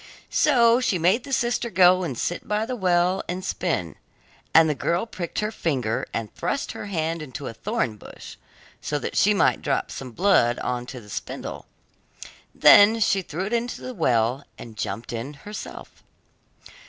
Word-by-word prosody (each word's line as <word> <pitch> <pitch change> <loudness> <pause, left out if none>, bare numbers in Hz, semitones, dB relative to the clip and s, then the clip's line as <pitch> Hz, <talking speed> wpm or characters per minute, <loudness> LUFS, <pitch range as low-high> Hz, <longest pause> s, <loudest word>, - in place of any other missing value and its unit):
So 240 -5 +4
she 220 -7 +1
made 185 - +2
the 280 - -9
sister 240 -2 0
go 185 -1 +5
and 135 -9 -4
sit 175 - -3
by 210 +1 0
the 250 +2 -4
well 180 -2 +2
and 180 +1 -4
spin, 135 - -2 0.5
and 160 0 +6
the 155 - +1
girl 170 - -1
pricked 185 -4 -5
her 210 +1 -2
finger 130 - -2
and 115 -2 -4
thrust 280 - -3
her - - -7
hand 165 -3 -2
into 145 -1 -7
a 115 - -5
thorn 160 - -2
bush, - - -11 0.5
so 150 - -2
that - - -5
she 210 +1 +4
might - - +2
drop 135 - -1
some 130 - -7
blood 120 - +3
on 125 -1 -3
to 130 -1 -7
the 105 - -16
spindle; - - -6 0.9
then 215 +3 +7
she 200 -2 +2
threw 180 +1 -5
it 210 - -4
into 235 +1 -2
the 255 - -7
well, 125 - +1
and 115 -2 -11
jumped 115 +2 -5
in 120 +6 -5
herself. 205 +9 -9
175 Hz, 175 wpm, -24 LUFS, 130-210 Hz, 0.9 s, then